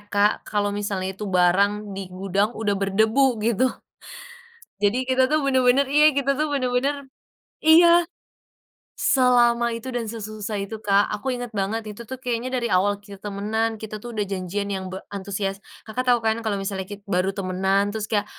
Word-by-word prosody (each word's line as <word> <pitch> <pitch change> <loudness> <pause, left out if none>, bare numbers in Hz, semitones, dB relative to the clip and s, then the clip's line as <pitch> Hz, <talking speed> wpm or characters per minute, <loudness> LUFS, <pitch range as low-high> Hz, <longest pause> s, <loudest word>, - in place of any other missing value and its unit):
Kak, 205 +1 +4 0.2
kalau 205 -1 0
misalnya 195 -2 -2
itu 210 - -5
barang 200 +3 +2
di 195 -2 -6
gudang, 195 +4 -1
udah 210 -2 0
berdebu, 220 +6 +2
gitu. 235 +3 +2 1.1
Jadi, 225 +6 +2
kita 260 0 +3
tuh 310 0 +2
benar-benar, 260 0 +3
iya, 300 +1 +5
kita 275 0 +1
tuh 305 0 +1
benar-benar 270 +2 -1 0.5
Iya. 340 +2 +7 0.9
Selama 240 -2 +3
itu 250 +2 -7
dan 230 -2 -3
sesusah 215 -1 -5
itu, 205 +2 -5
Kak. 200 -1 +3
Aku 260 +6 -3
ingat 245 -2 -4
banget 210 +3 -2
itu 210 +2 -8
tuh 260 +3 -7
kayaknya 245 -1 -3
dari 235 - -2
awal 200 0 +2
kita 200 -1 -13
temanan, 215 +2 -2
kita 215 -1 -7
tuh 240 - -8
udah 215 -3 -2
janjian 195 +1 -3
yang 190 -1 -4
be 190 - -6 0.2
antusias. 195 0 -3 0.2
Kakak 225 +3 -3
tahu, 245 - +6
kan, 220 +1 +1
kalau 215 -3 -1
misalnya 195 0 -3
ki 205 0 -9
baru 190 -1 0
temanan, 195 +1 0
terus 215 -1 -4
kayak, 210 -2 +1
215 Hz, 170 wpm, -23 LUFS, 200-245 Hz, 1.1 s, Iya